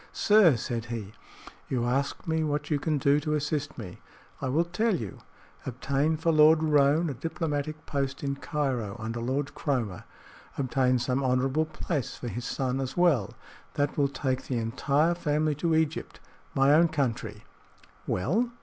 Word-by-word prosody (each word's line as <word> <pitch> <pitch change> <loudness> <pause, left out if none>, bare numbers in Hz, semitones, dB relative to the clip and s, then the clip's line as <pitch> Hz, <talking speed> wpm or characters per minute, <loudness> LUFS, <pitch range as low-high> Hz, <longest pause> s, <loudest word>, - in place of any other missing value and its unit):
"Sir," 205 -9 +5
said 115 +1 -3
he, 110 -4 -6 0.6
"you 120 -3 0
ask 135 +6 -1
me 160 0 +1
what 150 0 -2
you 145 - +2
can 155 +1 0
do 140 +1 +3
to 150 0 -1
assist 150 0 -2
me. 95 -7 -8 0.4
I 135 - -1
will 155 +6 +3
tell 200 +5 +1
you. 110 - -6 0.4
Obtain 140 +5 0
for 165 +2 +1
Lord 155 +1 +6
Roane 150 +2 +3
a - - -4
diplomatic 155 +1 -3
post 140 -1 -2
in 140 -1 -2
Cairo, 130 -9 -2
under 115 +1 -4
Lord 135 +4 -2
Cromer. 120 - -2 0.5
Obtain 130 -1 +2
some 125 +2 0
honorable 130 +4 +1
place 155 -2 -3
for 120 - -6
his 120 +2 -5
son 130 +1 -1
as 130 +4 -5
well. 165 - +2 0.4
That 145 0 0
will 140 -2 +3
take 130 -2 -2
the 125 - -1
entire 140 +8 +1
family 155 -2 0
to 160 +3 0
Egypt 160 -1 -1 0.4
my 135 +1 +5
own 165 +3 +6
country." 125 -8 -2 0.6
"Well?" 210 - +1
140 Hz, 160 wpm, -28 LUFS, 125-155 Hz, 0.6 s, Lord